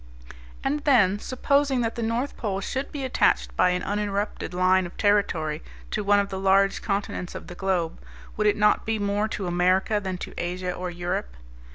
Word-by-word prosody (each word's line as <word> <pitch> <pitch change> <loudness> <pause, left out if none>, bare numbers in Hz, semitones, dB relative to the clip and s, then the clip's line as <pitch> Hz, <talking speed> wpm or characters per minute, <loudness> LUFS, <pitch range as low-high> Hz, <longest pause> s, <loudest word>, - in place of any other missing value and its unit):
And 280 +2 0
then 220 -9 +4
supposing 275 +2 +1
that 230 -1 -1
the 235 - -5
North 230 +5 -1
Pole 195 -4 -2
should 265 +7 -3
be 285 -2 -5
attached 260 - +2
by 180 - +4
an 180 0 -1
uninterrupted 205 0 -2
line 185 0 +3
of 175 - -15
territory 170 -7 +1 0.3
to 210 - -1
one 205 0 +4
of 200 0 -1
the 190 -1 -4
large 195 +1 +3
continents 195 -3 -3
of - - -7
the - - -9
globe, 175 - -1 0.3
would 210 0 +1
it 205 - +3
not 210 0 +3
be 225 0 -1
more 205 +1 0
to 205 -3 -4
America 185 +4 +2
than 190 -2 -4
to - - -7
Asia 180 +1 -2
or 180 0 -4
Europe? 175 - -3
200 Hz, 190 wpm, -25 LUFS, 180-215 Hz, 0.3 s, then